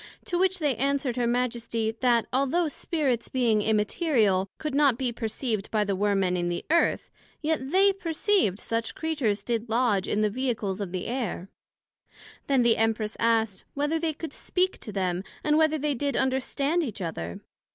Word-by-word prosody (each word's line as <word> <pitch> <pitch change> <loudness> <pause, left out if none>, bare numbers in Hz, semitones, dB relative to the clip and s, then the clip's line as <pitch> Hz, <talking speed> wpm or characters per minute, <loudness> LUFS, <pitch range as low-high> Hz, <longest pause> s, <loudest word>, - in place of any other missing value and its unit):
To 350 - -1
which 380 0 +2
they 295 -6 0
answered 275 -1 0
her 245 -1 0
Majesty, 235 -2 -1
That 240 -3 +3
although 275 +6 +2
Spirits, 280 -5 -1
being 235 -5 +2
immaterial, 210 - +2
could 305 -2 -4
not 280 -4 +4
be 255 -2 -1
perceived 225 -2 -3
by 215 -1 +1
the 200 -1 -1
Worm 200 0 +1
men 180 -1 +1
in 175 -1 -1
the 175 - -3
Earth, 335 - +2 0.3
yet 305 -4 -1
they 390 +4 +5
perceived 355 - +1
that - - -7
such 230 0 -2
Creatures 270 -11 -1
did 230 0 -2
lodg 225 -4 +2
in 210 - 0
the 215 - +3
Vehicles 215 -5 -2
of 195 -3 -4
the 185 -1 -3
Air. 235 -7 -3 1.0
Then 270 -3 +3
the 235 -1 +4
Empress 220 -1 0
asked, 225 -4 +1
Whether 295 +3 0
they 320 -1 -1
could 325 +1 -7
speak 370 +1 -1
to 215 - -7
them, 185 -2 -1 0.2
and 300 0 +3
whether 315 0 +3
they 300 0 0
did 280 +2 -1
understand 275 +5 +1
each 225 - -4
other? 85 - -5
240 Hz, 180 wpm, -27 LUFS, 210-295 Hz, 1.0 s, they